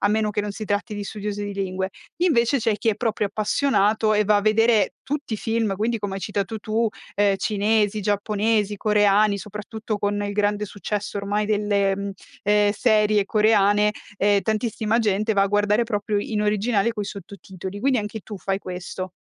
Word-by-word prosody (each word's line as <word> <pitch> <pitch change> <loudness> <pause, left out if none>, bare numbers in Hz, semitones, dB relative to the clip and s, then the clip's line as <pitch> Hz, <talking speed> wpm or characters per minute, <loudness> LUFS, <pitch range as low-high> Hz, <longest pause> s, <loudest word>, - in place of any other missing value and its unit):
a 200 - +2
meno 215 0 +1
che 210 0 -1
non 210 - -3
si 215 +2 -6
tratti 205 +1 -2
di 205 - -4
studiosi 205 0 -4
di 200 -1 -5
lingue. 190 -1 -2 0.3
Invece 275 -7 +3
c'è 225 -2 0
chi 225 - -1
è - - -1
proprio 220 -1 -1
appassionato, 215 0 +1
e 210 0 +3
va 210 +1 +4
a - - +3
vedere 220 0 +3
tutti 285 -4 -4
i - - 0
film 225 -3 0
quindi, 225 +2 0
come 200 -2 -4
hai 195 - -5
citato 205 +2 -3
tu, 220 +2 0 0.3
ehm, 200 -1 +3
cinesi, 210 0 +1
giapponesi, 210 0 0
coreani, 210 0 +3
soprattutto 210 +1 -5
con 205 0 -1
il 205 0 -3
grande 205 0 0
successo 205 0 -4
ormai 205 +1 -1
delle, 205 -2 +1
mhmm, 200 0 -4 0.3
ehm, 205 0 +3
serie 210 -3 +3
coreane, 210 -1 +3 0.3
ehm, 200 0 +3
tantissima 220 0 0
gente 215 0 +1
va 200 -1 +3
a - - +3
guardare 205 +3 +2
proprio 210 -2 -1
in 210 0 -2
originale 210 +1 +1
coi 210 -3 -4
sottotitoli. 195 0 -8
Quindi 260 -1 +2
anche 210 +1 -4
tu 210 +1 -8
fai 195 0 -2
questo? 185 0 -6
210 Hz, 185 wpm, -23 LUFS, 200-220 Hz, 0.3 s, va